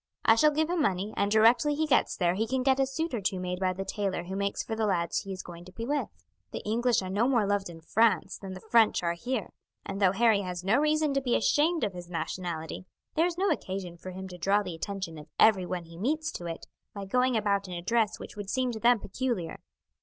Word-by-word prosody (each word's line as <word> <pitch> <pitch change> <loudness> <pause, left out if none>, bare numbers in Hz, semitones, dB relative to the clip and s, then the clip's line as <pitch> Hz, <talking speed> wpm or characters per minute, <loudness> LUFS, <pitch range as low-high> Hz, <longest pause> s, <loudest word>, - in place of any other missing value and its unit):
I - - +7
shall 265 +7 +5
give 310 +1 +1
him 345 -1 0
money, 200 -4 0
and 200 - +1
directly 235 +7 +5
he 315 +2 +1
gets 295 - +2
there 175 -2 +2
he 220 +4 -1
can 260 +1 0
get 265 0 +3
a 270 - +3
suit 320 +4 -3
or 230 - -1
two 190 -1 -1
made 180 0 -3
by 185 -1 +1
the 195 +1 -5
tailor 195 -4 -2
who 190 +2 -6
makes 200 0 -1
for 225 - -4
the 220 -1 0
lads 170 -4 0
he 195 - -7
is 190 -1 -5
going 170 -1 -10
to 185 - -12
be 230 +4 -6
with. 290 +3 -1 0.4
The - - -6
English 235 0 +2
are 185 - -5
no 215 +5 +2
more 240 -6 +3
loved 200 -1 0
in 165 -1 -11
France 220 +7 +2
than 190 -1 -7
the 185 - -11
French 225 -5 +4
are 170 0 +1
here, 240 +5 -3 0.3
and 195 +1 -5
though 190 -1 +5
Harry 220 -1 +4
has 180 -2 -5
no 205 +8 +3
reason 305 -1 +2
to 275 - +1
be 250 -2 +1
ashamed 315 +7 +2
of 205 -3 0
his 175 -1 -9
nationality 170 0 -4 0.3
there 330 +3 +3
is 345 -1 -5
no 390 0 +2
occasion 190 - -3
for 180 +2 -9
him 190 +1 -7
to 180 -1 -10
draw 200 +4 +2
the 180 -3 -5
attention 170 -1 -5
of 150 - -12
everyone 185 -4 +3
he 165 0 -13
meets 305 +9 -1
to 175 - -6
it 165 -1 -6 0.3
by 200 -1 -5
going 250 +4 +2
about 200 -2 0
in 180 - -6
a 175 - -4
dress 225 +1 +1
which - - -10
would 205 -2 -6
seem 255 +1 0
to 220 - -5
them 240 +1 +4
peculiar." 205 -6 -3
205 Hz, 255 wpm, -29 LUFS, 185-250 Hz, 0.4 s, I